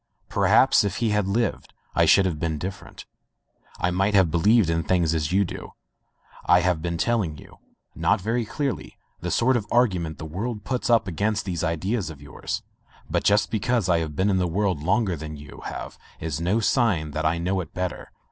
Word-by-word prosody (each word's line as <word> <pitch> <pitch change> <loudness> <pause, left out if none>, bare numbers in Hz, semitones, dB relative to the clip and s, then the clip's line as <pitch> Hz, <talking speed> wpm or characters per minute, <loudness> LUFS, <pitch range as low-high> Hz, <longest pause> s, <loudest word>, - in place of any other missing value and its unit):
Perhaps - - +4
if 100 -1 -2
he 115 -1 0
had 105 -2 +1
lived 115 +4 -1 0.2
I - - +4
should 100 - +5
have 85 -5 -2
been 80 -1 -1
different. 95 +5 -7 0.7
I 90 - +1
might 95 +3 +1
have 95 -5 +4
believed 105 +5 +4
in 80 0 +1
things 85 -1 +1
as 80 -1 -1
you 100 +2 +3
do. - - -8 0.7
I 90 0 +5
have 90 -3 +1
been 85 0 -2
telling 100 -7 0
you - - -15 0.2
— - - -53
not - - +2
very 115 +5 -1
cleverly 125 - -4
— - - -44
the - - -3
sort 130 +2 +2
of 110 -4 -1
argument 90 -10 +1
the 80 - -7
world 105 +7 -4
puts 125 +1 -2
up 115 -3 +4
against 105 +4 -1
these 85 -4 -3
ideas 90 +4 -1
of 75 -3 -10
yours. 70 -2 -5 0.5
But - - +1
just 105 +1 +3
be 110 - 0
cause 115 -3 0
I 85 -1 +4
have 80 -2 -4
been 95 +5 +2
in 95 - +2
the 90 - +1
world 90 -2 0
longer 95 +3 +1
than 75 0 -7
you 75 0 -12
have - - -7 0.2
is 80 -1 -3
no 95 +6 +1
sign 105 - +1
that 80 +2 -3
I 80 +2 +1
know 90 +3 -1
it 80 - -9
better. 90 -1 -4
95 Hz, 210 wpm, -24 LUFS, 80-105 Hz, 0.7 s, should